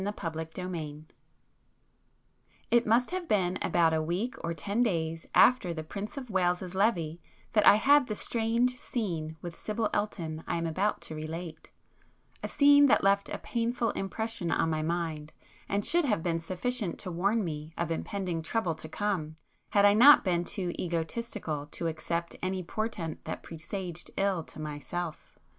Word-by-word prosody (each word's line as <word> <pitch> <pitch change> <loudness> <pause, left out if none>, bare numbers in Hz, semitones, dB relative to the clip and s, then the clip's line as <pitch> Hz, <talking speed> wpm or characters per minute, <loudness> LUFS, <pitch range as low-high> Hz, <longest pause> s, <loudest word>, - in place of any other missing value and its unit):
[p 195 - -2
193]XVII 160 -4 -5 1.7
It 240 -1 +4
must 240 +6 +3
have 365 -2 -3
been 185 - +1
about 165 -2 +3
a 160 - +2
week 180 +10 -1
or 170 - -1
ten 200 +8 -1
days 165 -7 -1
after 195 -9 +5
the 160 - -4
Prince 200 - -6
of 255 -4 -6
Wales's 180 -1 0
Levée 175 -5 +1 0.3
that 210 -1 +4
I - - +10
had 280 +4 +5
the 215 - -3
strange 235 +3 +1
scene 165 -9 -3
with 170 -1 -6
Sibyl 215 0 -2
Elton 165 -6 -2
I - - -1
am 165 - -2
about 185 +6 0
to - - -6
relate; 155 +1 -6 0.7
a - - -3
scene 285 0 +6
that - - +4
left 200 0 +3
a - - -3
painful 235 0 -1
impression 210 -2 -3
on 160 - +1
my 155 -1 0
mind 160 -2 -3 0.4
and 200 0 0
should 345 -1 +4
have 210 - 0
been 165 -2 0
sufficient 190 +3 -2
to 180 - -5
warn 200 +6 +1
me 155 -1 -5
of 170 -1 -1
impending 180 0 -2
trouble 175 +1 -1
to 155 0 -10
come 165 -4 -2 0.3
had 205 -1 +4
I 205 - +7
not 260 +8 +8
been 175 -2 +1
too 180 -2 -2
egotistical 165 -2 -3
to 170 - -4
accept 170 +1 -2
any 185 0 -2
portent 185 -4 -4
that - - -5
presaged 175 +1 -6
ill 195 -3 +1
to - - -12
myself. 155 +2 -5
180 Hz, 165 wpm, -29 LUFS, 165-215 Hz, 1.7 s, I